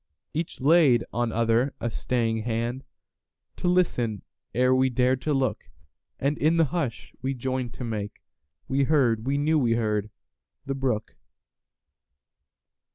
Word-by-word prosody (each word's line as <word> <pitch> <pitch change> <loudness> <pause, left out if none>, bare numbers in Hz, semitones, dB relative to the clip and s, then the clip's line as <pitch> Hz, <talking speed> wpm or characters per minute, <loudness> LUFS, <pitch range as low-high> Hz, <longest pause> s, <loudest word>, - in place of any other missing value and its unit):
Each 160 +2 -3
laid 140 -4 +5
on 120 -1 0
other 115 +4 +1
a 120 0 -2
staying 115 -1 -1
handTo 120 +9 -7
listen 125 - +1 0.3
ere 125 +1 +3
we 130 0 +3
dared 125 +1 +1
to 150 - -1
look, 135 -4 0 0.5
And 140 +2 0
in 160 +3 +3
the 165 - +5
hush 140 -7 -3
we 135 +1 -2
joined 130 -1 -3
to - - -6
makeWe 105 - -4
heard—we 135 -3 +2
knew 155 +2 +2
we 120 -4 +2
heard—the 110 +4 -4
brook. 130 -5 -2
125 Hz, 120 wpm, -26 LUFS, 115-140 Hz, 0.5 s, laid